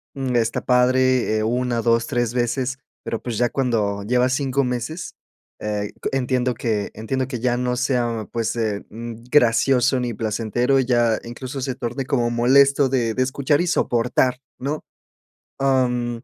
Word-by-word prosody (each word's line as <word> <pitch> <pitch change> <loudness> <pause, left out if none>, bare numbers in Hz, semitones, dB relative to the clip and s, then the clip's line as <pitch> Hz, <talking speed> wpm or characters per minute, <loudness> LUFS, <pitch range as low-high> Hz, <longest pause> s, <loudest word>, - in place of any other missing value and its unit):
mm, 130 -2 -2
está 115 -1 0
padre, 125 -2 +3
eh, 110 - 0
1, 120 0 0
2, 115 0 +3
3 120 -1 -1
veces, 125 +2 -1 0.3
pero, 115 - -3
pues 120 -4 -4
ya 120 0 +2
cuando 110 -7 0
llevas 125 +4 +2
5 140 0 0
meses, 125 +7 -4 0.4
eh 105 -1 -3
c - - 0
entiendo 125 -1 0
que 110 -3 -2
entiendo 130 +4 -2
que 130 -3 -4
ya 120 +1 +1
no 125 0 -1
sea, 120 -4 -1
pues, 115 -1 -1
eh, 110 -3 -2
mm, 115 +1 -8
gracioso 130 0 +4
ni 120 -1 -2
placentero, 115 +5 0
ya 120 -3 +2
incluso, 130 +3 -6
se 130 0 -2
torne 125 +2 -4
como 120 -3 +1
molesto 135 +3 +4
de 120 -4 0
de 130 - +2
escuchar 140 +3 +1
y - - 0
soportar, 125 -4 +1 0.2
¿no? 145 +4 -3 0.8
Am, 125 -3 +1
125 Hz, 160 wpm, -22 LUFS, 115-130 Hz, 0.8 s, gracioso